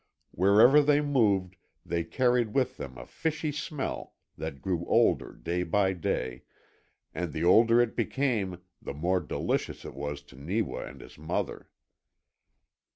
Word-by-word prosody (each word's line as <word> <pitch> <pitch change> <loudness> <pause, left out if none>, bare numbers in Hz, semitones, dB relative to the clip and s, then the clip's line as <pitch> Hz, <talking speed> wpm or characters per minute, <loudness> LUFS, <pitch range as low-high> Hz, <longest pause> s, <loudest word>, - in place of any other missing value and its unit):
Wherever 110 - +6
they 145 0 +4
moved 105 -11 +1 0.3
they 85 -1 -1
carried 120 +4 +1
with 135 -2 +1
them 65 -3 -7
a - - -9
fishy 155 - -2
smell 150 -1 -5 0.2
that 80 -4 -6
grew 90 +1 -2
older - - +3
day 90 +1 -3
by 95 +2 +1
day, 65 -8 -2 0.7
and 85 +1 -3
the 80 +3 -3
older 115 +6 +6
it 120 -1 +2
became 105 -10 -1 0.2
the - - -6
more 90 +5 +1
delicious 80 - -2
it - - -7
was 75 0 -5
to 70 - -17
Neewa 90 +10 -2
and 65 +2 -11
his 65 +3 -14
mother. 80 - -3
95 Hz, 145 wpm, -29 LUFS, 80-120 Hz, 0.7 s, Wherever